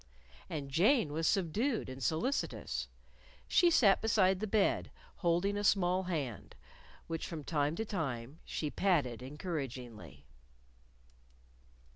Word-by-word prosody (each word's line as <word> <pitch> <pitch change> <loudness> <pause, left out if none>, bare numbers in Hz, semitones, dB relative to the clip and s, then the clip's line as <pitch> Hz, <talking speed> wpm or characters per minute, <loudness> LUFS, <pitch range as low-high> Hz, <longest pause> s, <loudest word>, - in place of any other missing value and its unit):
And 140 -3 -5
Jane 180 - +3
was 160 +1 0
subdued 215 - 0
and 130 0 -7
solicitous. 165 - -1 0.6
She 350 - +5
sat 215 -12 +5
beside 195 -4 +3
the 215 - -2
bed, 210 -1 +1 0.3
holding 175 +3 +1
a 205 - -2
small 185 -2 +2
hand 145 - -4 0.5
which 165 -1 -4
from 160 -3 -6
time 150 0 0
to 220 - -2
time 140 - -4
she 150 -2 -3
patted 145 - +1
encouragingly. 125 - -6
165 Hz, 115 wpm, -33 LUFS, 140-195 Hz, 0.6 s, She